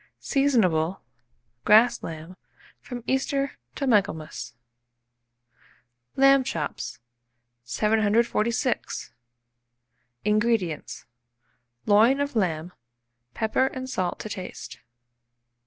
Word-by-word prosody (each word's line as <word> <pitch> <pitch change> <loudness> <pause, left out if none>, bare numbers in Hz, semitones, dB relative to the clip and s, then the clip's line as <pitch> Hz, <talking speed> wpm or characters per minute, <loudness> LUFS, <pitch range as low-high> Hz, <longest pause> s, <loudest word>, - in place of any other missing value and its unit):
Seasonable, 195 - +1 0.6
grass 225 +3 +5
lamb, 165 +2 -8 0.4
from 245 -2 -8
Easter 275 +1 -1 0.2
to 280 - -2
Michaelmas. 155 - 0 1.6
LAMB 275 0 +6
CHOPS. 150 - -4 0.7
746. 220 - 0 1.1
INGREDIENTS. 210 -6 0 0.8
Loin 225 +7 +5
of 285 -2 -2
lamb, 175 -4 -1 0.6
pepper 225 +4 +1
and 260 -1 -6
salt 185 -8 -2
to - - -6
taste. 185 - -7
215 Hz, 75 wpm, -25 LUFS, 175-260 Hz, 1.6 s, LAMB